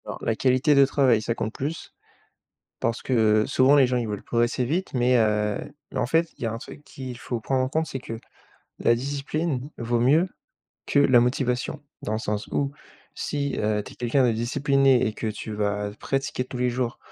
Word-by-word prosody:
Alors, - - -7
la 115 - +1
qualité 130 +5 +3
de 140 -1 +6
travail, 130 -5 +3
ça 115 +1 -2
compte 110 -1 -3
plus, 150 +5 -5 0.9
parce 115 0 -1
que 110 -4 +3
souvent 135 +3 +4
les 140 -2 +6
gens, 125 0 0
ils 120 -2 -1
veulent 105 -2 -4
progresser 120 +1 0
vite, 170 +9 -2
mais, 125 0 +3
heu, 105 -2 +2 0.4
en - - +1
fait, 165 +4 +2
il - - -8
y - - 0
a - - -2
un 115 - -4
truc 145 +4 -11
qu'il 130 -4 -8
faut 120 -1 -4
prendre 130 +3 0
en 130 - -1
compte, 160 +3 0
c'est 135 - -5
que 115 -2 -7 0.6
la 115 - +4
discipline 140 +2 -3
vaut 120 0 0
mieux 150 +9 +4 0.6
que 145 - +2
la 130 -3 +6
motivation. 125 +4 -1 0.2
Dans 105 - -3
le - - 0
sens 105 -3 -3
où, 140 -1 -1 0.4
si 140 -1 -2
tu - - -3
es 105 0 0
quelqu'un 125 +2 +2
de 120 - +3
discipliné 135 +2 +2
et 110 - 0
que 110 - -4
tu 110 +1 -5
vas 105 0 -1
pratiquer 135 -2 -2
tous 130 - -7
les 125 0 +1
jours, 120 -1 -2
125 Hz, 205 wpm, -25 LUFS, 115-140 Hz, 0.9 s, de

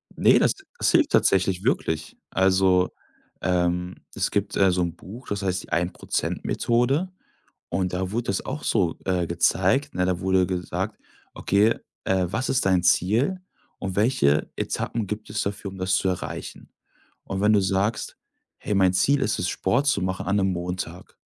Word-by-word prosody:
Ne, - - +5
das - - +3 0.2
das - - +2
hilft 320 -3 +3
tatsächlich 95 0 +2
wirklich. 80 - -1
Also, 95 -1 +3 0.5
ähm, 90 0 0 0.2
es - - -1
gibt, 100 0 -1
äh, 95 -2 +4
so 90 0 0
'n 85 -1 -2
Buch, 110 +8 -11
das 100 -1 -3
heißt 95 -2 -1
die - - -15
Ein-Prozent-Methode 120 - 0 0.6
und 90 0 -1
da 95 +1 -2
wurde 115 +2 -2
das 95 - -2
auch 150 - -5
so, 90 -7 +1
äh, 90 -3 0
gezeigt, 95 - +1
ne? 90 0 +1
Da 90 -1 0
wurde 95 -1 +2
gesagt: 90 -1 -3 0.4
„Okay, 105 +3 +2 0.3
äh, 95 -1 +1
was 115 +8 -2
ist 130 -6 +1
dein 90 -2 +3
Ziel 110 - +2 0.4
und 95 -1 -4
welche 100 - +2
Etappen 115 -3 -2
gibt 105 +1 -6
es 105 0 -1
dafür, 100 0 -4
um 95 - -11
das 95 0 0
zu 95 - 0
erreichen.“ 90 - -5 0.5
Und 95 0 -4
wenn 105 +1 +4
du 105 - +5
sagst: 95 +3 -1 0.4
„Hey, 105 - -3
mein 95 -2 +4
Ziel 135 +10 +3
ist 105 - 0
es, 90 - -1
Sport 120 +9 0
zu 120 -9 +2
machen 95 -1 -2
an 100 +2 +1
'nem 95 -2 +2
Montag.“ 90 0 -5
95 Hz, 170 wpm, -24 LUFS, 90-105 Hz, 0.6 s, Ne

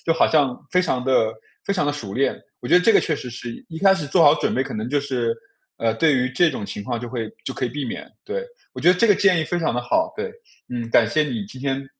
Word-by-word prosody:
就 165 - +4
好 - - +4
像 140 -5 +2
非 180 - +3
常 130 -8 -1
地 125 -4 +3 0.4
非 200 - +1
常 180 - +1
地 145 - +1
熟 105 -9 -6
练， 135 +2 +1 0.3
我 - - -7
觉 - - -2
得 - - 0
这 220 +4 +4
个 - - +8
确 160 - 0
实 130 - -7
是 120 0 -7 0.2
一 160 -2 -7
开 195 +2 +5
始 165 -6 -4
做 165 +4 +3
好 145 0 +7
准 - - -1
备 130 - +1
可 - - -7
能 110 +2 -3
就 145 +2 +1
是， 120 -5 -1 0.4
呃， 115 -1 0
对 145 +5 +3
于 130 0 0
这 170 +6 +4
种 105 - -5
情 100 0 -6
况 120 +1 -3
就 120 0 -7
会 115 -4 -4
就 130 - -3
可 130 - -8
以 125 - +1
避 145 +2 -4
免， 120 - -6
对， 465 +5 -3 0.3
我 - - -7
觉 180 - +6
得 - - +4
这 230 - +4
个 205 - +6
建 190 -3 +3
议 160 - 0
非 175 +2 -2
常 160 - 0
地 125 - -1
好。 320 - +1
对， 455 +1 -4 0.4
嗯， 120 -2 -4
感 115 0 +4
谢 155 +8 +2
你 120 -8 -3
今 130 +6 -11
天 135 0 -2
135 Hz, 315 characters per minute, -22 LUFS, 120-165 Hz, 0.4 s, 个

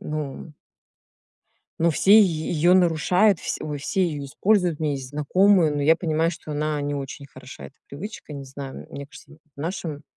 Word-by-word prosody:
Ну 150 0 -6 1.3
ну, 170 +1 +3
все 195 +6 +3
е 160 -6 0
её 175 +2 +3
нарушают, 180 +2 +3
вс - - -3
ой, 150 -1 -4
все 185 +6 0
её 145 -4 -4
используют. 180 +2 +1
У - - -6
меня 150 -2 +1
есть 135 -2 -5
знакомые, 165 +3 +3
но 145 -1 -2
я 160 +3 +5
понимаю, 165 -1 0
что 160 -2 -8
она 150 0 -1
не 145 0 -2
очень 140 0 -6
хороша, 130 -1 -12
эта 140 - -16
привычка. 155 +1 -8
Не 140 -1 -7
знаю, 135 0 -8
м - - -17
мне 140 0 -7
кажется, - - -15 0.2
в - - -10
нашем 160 -3 -4
155 Hz, 190 wpm, -24 LUFS, 145-175 Hz, 1.3 s, я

